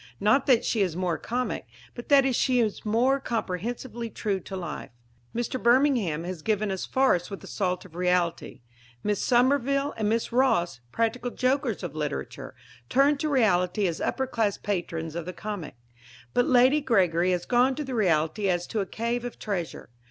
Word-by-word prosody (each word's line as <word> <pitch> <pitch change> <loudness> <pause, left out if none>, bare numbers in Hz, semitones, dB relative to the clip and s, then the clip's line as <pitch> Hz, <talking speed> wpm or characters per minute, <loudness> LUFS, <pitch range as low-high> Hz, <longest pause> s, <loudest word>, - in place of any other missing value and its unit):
Not 215 +7 +3
that 250 -3 +4
she 220 - +1
is 180 -5 0
more 180 -2 -1
comic, 245 - -3 0.3
but 240 - -9
that 275 -2 +5
she 255 0 +2
is 220 -3 0
more 245 +6 +2
comprehensively 230 +1 -4
true 200 -3 -2
to 190 - -8
life. 170 -4 -6 0.5
Mr. 240 +2 -2
Birmingham 235 - +3
has 180 -2 -5
given 215 +1 0
us 190 - -4
farce 260 -10 +2
with 195 - -8
a - - -9
salt 185 -2 -2
of 180 - -15
reality; 180 -4 -1 0.4
Miss 205 -1 0
Somerville 275 +3 +2
and 215 -2 0
Miss 230 +2 0
Ross, 230 - +2
practical 230 - -1
jokers 255 +3 0
of - - -4
literature, - - -5 0.3
turned 280 +2 +3
to 310 - -1
reality 200 -7 +2
as 170 -3 -2
upper 265 - 0
class 220 -5 0
patrons 165 -5 -3
of 170 -1 -4
the 180 - -4
comic; 195 -7 -6 0.6
but 245 - +2
Lady 255 +4 +5
Gregory 185 - +2
has 180 -1 0
gone 250 +2 +3
to 300 - -4
reality 185 -2 +1
as 175 -1 0
to 220 - -3
a 195 - -1
cave 235 +4 -2
of 245 - -6
treasure. 175 - -4
215 Hz, 175 wpm, -26 LUFS, 180-250 Hz, 0.6 s, that